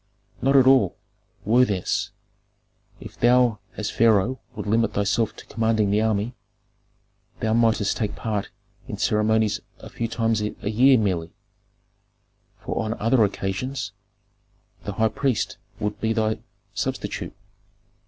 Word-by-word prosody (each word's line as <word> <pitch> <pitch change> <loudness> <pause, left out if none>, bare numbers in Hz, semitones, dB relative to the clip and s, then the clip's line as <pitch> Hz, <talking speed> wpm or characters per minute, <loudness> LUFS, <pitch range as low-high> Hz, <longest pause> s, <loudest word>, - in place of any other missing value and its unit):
"Not 135 +2 +3
at 135 -2 +7
all. 130 -8 +5 0.5
Worthiness, 110 -4 +2 0.9
if - - -11
thou 120 -3 +4 0.2
as 105 -1 -2
pharaoh 115 +2 +3 0.2
would - - -5
limit 115 +1 +1
thyself 105 +2 +1
to - - -12
commanding 110 -2 +1
the 105 +1 +3
army, 110 +1 0 1.1
thou 110 0 0
mightst 115 -3 +2
take 105 -2 -2
part 105 -3 -3 0.4
in - - -5
ceremonies 110 0 +2 0.2
a - - -12
few 115 - -2
times 115 -1 0
a 105 - -1 0.2
year 130 +4 +6
merely, 90 -6 -1 1.3
for - - -2
on 110 +1 -2
other 115 +1 +3
occasions 105 +5 -2 0.9
the 100 - -3
high 110 +2 +2
priest 130 0 -1 0.2
would 105 0 -3
be 110 0 +1
thy 110 -1 0 0.3
substitute. - - -3
110 Hz, 125 wpm, -24 LUFS, 105-115 Hz, 1.3 s, at